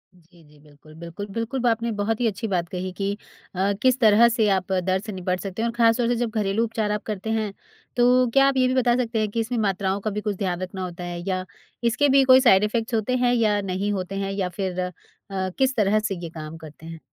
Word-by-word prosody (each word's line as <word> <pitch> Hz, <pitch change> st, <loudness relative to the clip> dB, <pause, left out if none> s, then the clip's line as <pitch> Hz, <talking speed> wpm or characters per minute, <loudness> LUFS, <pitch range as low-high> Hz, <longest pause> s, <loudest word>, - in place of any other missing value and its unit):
जी, 170 Hz, -1 st, -22 dB
जी। 150 Hz, 0 st, -21 dB
बिल्कुल, 150 Hz, +1 st, -18 dB
बिल्कुल, 170 Hz, +4 st, -7 dB
बिल्कुल। 235 Hz, +3 st, -3 dB
आपने 230 Hz, +1 st, 0 dB
बहुत 220 Hz, +2 st, 0 dB
ही 235 Hz, -, +3 dB
अच्छी 225 Hz, +2 st, -3 dB
बात 175 Hz, -4 st, -1 dB
कही 185 Hz, 0 st, -4 dB
कि 200 Hz, 0 st, -1 dB, 0.4 s
अ, 195 Hz, +2 st, +1 dB
किस 255 Hz, 0 st, +3 dB
तरह 225 Hz, 0 st, +6 dB
से 225 Hz, -2 st, +1 dB
आप 190 Hz, -1 st, 0 dB
दर्द 190 Hz, +2 st, 0 dB
से 215 Hz, -, -6 dB
निपट 185 Hz, -1 st, -2 dB
सकते 195 Hz, +2 st, -5 dB
हैं 235 Hz, -, +1 dB
और 230 Hz, -, -6 dB
ख़ास 230 Hz, -1 st, +4 dB
तौर 240 Hz, -2 st, +1 dB
से 240 Hz, -, +1 dB
जब 235 Hz, -1 st, -1 dB
घरेलू 210 Hz, 0 st, 0 dB
उपचार 220 Hz, -2 st, -2 dB
आप 210 Hz, 0 st, -2 dB
करते 215 Hz, 0 st, -4 dB
हैं 215 Hz, -3 st, -1 dB, 0.4 s
तो 250 Hz, +1 st, +4 dB
क्या 275 Hz, 0 st, +5 dB
आप 275 Hz, -1 st, +1 dB
ये 255 Hz, -1 st, +4 dB
भी 255 Hz, -, 0 dB
बता 245 Hz, -2 st, +3 dB
सकते 235 Hz, -2 st, -1 dB
हैं 215 Hz, -1 st, 0 dB
कि 230 Hz, -, -2 dB
इसमें 230 Hz, +2 st, -2 dB
मात्राओं 195 Hz, -1 st, 0 dB
का 215 Hz, -, -2 dB
भी 210 Hz, -, -3 dB
कुछ 210 Hz, -2 st, -2 dB
ध्यान 185 Hz, -2 st, -2 dB
रखना 185 Hz, 0 st, -5 dB
होता 175 Hz, -1 st, -6 dB
है? 175 Hz, 0 st, -5 dB
या 185 Hz, -1 st, -1 dB, 0.4 s
इसके 275 Hz, +5 st, +2 dB
भी 270 Hz, 0 st, +5 dB
कोई 260 Hz, 0 st, +7 dB
साइड 200 Hz, -6 st, +5 dB
इफ़ेक्ट्स 225 Hz, +2 st, -1 dB
होते 225 Hz, +3 st, 0 dB
हैं 245 Hz, 0 st, +2 dB
या 215 Hz, -4 st, +2 dB
नहीं 195 Hz, +2 st, -2 dB
होते 190 Hz, 0 st, -4 dB
हैं? 195 Hz, 0 st, -2 dB
या 195 Hz, -2 st, -2 dB
फिर 185 Hz, -1 st, -4 dB
अ, 180 Hz, 0 st, -2 dB, 0.4 s
किस 195 Hz, +8 st, -1 dB
तरह 215 Hz, -1 st, +3 dB
से 210 Hz, -2 st, -2 dB
ये 170 Hz, -, -5 dB
काम 155 Hz, 0 st, -8 dB
करते 160 Hz, 0 st, -13 dB
हैं? 165 Hz, -1 st, -8 dB
205 Hz, 250 wpm, -24 LUFS, 185-230 Hz, 0.4 s, कोई